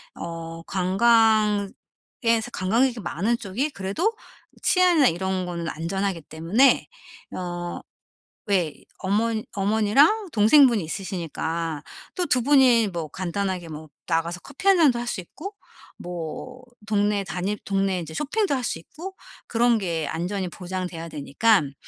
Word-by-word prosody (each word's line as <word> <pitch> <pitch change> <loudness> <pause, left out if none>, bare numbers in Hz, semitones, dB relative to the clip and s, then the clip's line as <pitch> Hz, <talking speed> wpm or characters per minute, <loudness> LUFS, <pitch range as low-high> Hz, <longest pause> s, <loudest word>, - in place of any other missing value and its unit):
어 165 0 -7
관광에서 215 +3 +1
관광객이 230 +6 +1
많은 205 +5 -1
쪽이 235 +10 -2
그래도 280 - -1 0.5
치안이나 355 -7 +4
이런 185 +1 -1
거는 170 -1 -4
안전하기 185 +2 -2
때문에 175 - +3 0.5
어 175 -1 -4 0.7
왜 180 -7 +1 0.3
어머 215 +4 +1 0.2
어머니랑 220 - +3
동생분이 230 - +5
있으시니까 165 -3 -3 0.3
또 360 -2 -1
2 250 -1 +2
분이 255 -5 +5
뭐 170 -4 -4
간단하게 185 0 -3
뭐 155 0 -9 0.2
나가서 170 +1 -1
커피 370 - -7
1 390 -1 +7
잔도 275 -8 +4
할 240 - -4
수 215 - -2
있고 325 - -9 0.4
뭐 180 +9 -7 0.2
동네 205 -1 +1
다닐 190 +2 -3
동네 195 -1 0
이제 160 -1 -8
쇼핑도 325 - 0
할 260 -2 -1
수 225 - -1
있고 340 - -10 0.3
그런 235 0 +3
게 170 -5 -2
안전이 180 +3 -3
보장돼야 180 -2 -5
되니깐 145 +2 +1
195 Hz, 265 characters per minute, -24 LUFS, 175-235 Hz, 0.7 s, 1